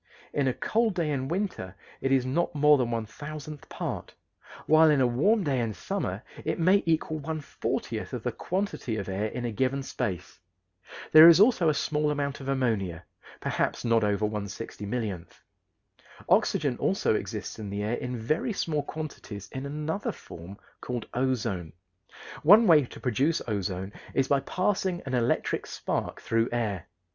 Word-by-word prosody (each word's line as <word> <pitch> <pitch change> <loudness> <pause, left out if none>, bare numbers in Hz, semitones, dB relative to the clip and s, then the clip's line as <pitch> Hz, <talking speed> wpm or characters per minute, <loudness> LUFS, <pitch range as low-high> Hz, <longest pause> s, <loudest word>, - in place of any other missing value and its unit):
In 140 -2 +1
a 130 - +2
cold 225 -3 +1
day 165 -4 0
in 135 -2 -1
winter 170 - -3 0.3
it 135 - 0
is 130 -2 +3
not 155 +6 0
more 150 0 +5
than 120 -2 0
one 115 -2 -2
thousandth 150 +4 -8
part, - - -5 0.5
while 155 +1 +6
in 150 -2 +4
a 130 - +4
warm 170 - +2
day 140 -5 0
in 115 -3 -2
summer - - -3 0.2
it - - -1
may 185 +4 +4
equal 160 -1 +1
one 155 +2 -4
fortieth 145 - -4
of - - -5
the - - -1
quantity 185 - -3
of 100 - -4
air 100 +3 -1
in 120 +2 -5
a 120 - -1
given 130 +5 0
space. 95 -10 -4 0.7
There 155 +1 +11
is 170 +1 +8
also 205 -6 +5
a 150 - +1
small 150 +1 0
amount 140 -1 -2
of 135 - -8
ammonia, 105 -11 -1 0.4
perhaps - - -1
not 115 -1 +3
over 105 0 +1
one 105 -1 -3
sixty 105 +1 -7
millionth. 100 -7 -4 0.9
Oxygen - - +2
also - - +1
exists - - -4
in 105 -2 -5
the 100 +1 -3
air 110 +3 -1
in 125 0 -4
very 155 - -1
small 155 -6 -1
quantities 140 -10 -7
in 135 +1 -5
another 155 +6 -3
form 85 +4 -11 0.2
called 120 -2 -4
ozone. 115 -10 -1 0.7
One 205 +8 +8
way 155 -7 +6
to - - -12
produce 140 +6 +1
ozone 100 -2 -3 0.2
is 135 -1 +2
by 140 - +3
passing 185 +4 -1
an 130 - -4
electric 120 -1 0
spark - - -3
through 115 0 +1
air. 105 -7 -2
130 Hz, 170 wpm, -28 LUFS, 110-155 Hz, 0.9 s, There